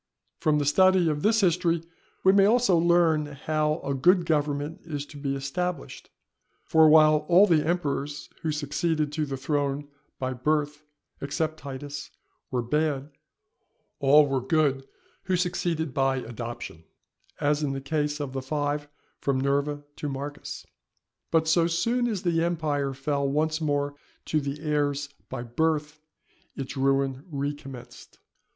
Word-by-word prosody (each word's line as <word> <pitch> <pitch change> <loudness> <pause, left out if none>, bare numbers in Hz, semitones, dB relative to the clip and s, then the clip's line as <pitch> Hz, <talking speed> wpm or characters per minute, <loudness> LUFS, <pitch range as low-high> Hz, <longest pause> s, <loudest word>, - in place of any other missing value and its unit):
From 155 -1 +2
the 145 - 0
study 185 +4 +4
of 150 -1 -1
this 220 +4 +3
history 170 -2 +2 0.4
we 190 - +7
may 195 0 +5
also 230 -4 +4
learn 165 -2 +3
how 150 +2 -1
a 140 - -2
good 175 +6 +4
government 150 0 -1
is 145 -3 -5
to 145 - -12
be 140 -1 -2
established; 170 +7 -4 0.6
for 160 -1 +6
while 155 0 +7
all 180 +4 +7
the 165 -6 +3
emperors 145 -3 -2
who 160 -2 -1
succeeded 150 +1 -1
to 150 0 -2
the 135 -1 -4
throne 145 +1 -1 0.3
by 130 0 -2
birth, 150 +3 -1 0.4
except 155 +3 -2
Titus, 140 +1 -7 0.4
were 125 -2 -1
bad, 150 +2 -1 0.9
all 145 +2 +6
were 135 -2 -1
good 135 -1 +1 0.4
who 185 - +1
succeeded 170 -4 -1
by 135 0 +2
adoption; 115 -8 -7 0.6
as 145 +1 +1
in 145 -2 -1
the 135 - -3
case 150 +1 -1
of 140 -3 -4
the 135 - -3
five 145 +1 -2 0.3
from 135 -2 0
Nerva 140 +2 0
to 150 - -3
Marcus. 140 +1 -6 0.6
But 160 -1 +2
so 165 +1 +4
soon 230 +9 +1
as 210 -6 -2
the 165 -2 +1
empire 150 -5 -1
fell 140 +1 -1
once 155 +3 0
more 145 -2 0 0.3
to 155 - 0
the 140 +1 -5
heirs 145 -2 0 0.2
by 125 -2 -5
birth, 150 +4 -1 0.6
its 135 0 -5
ruin 135 0 +1
recommenced. 140 -3 -6
150 Hz, 145 wpm, -26 LUFS, 140-160 Hz, 0.9 s, we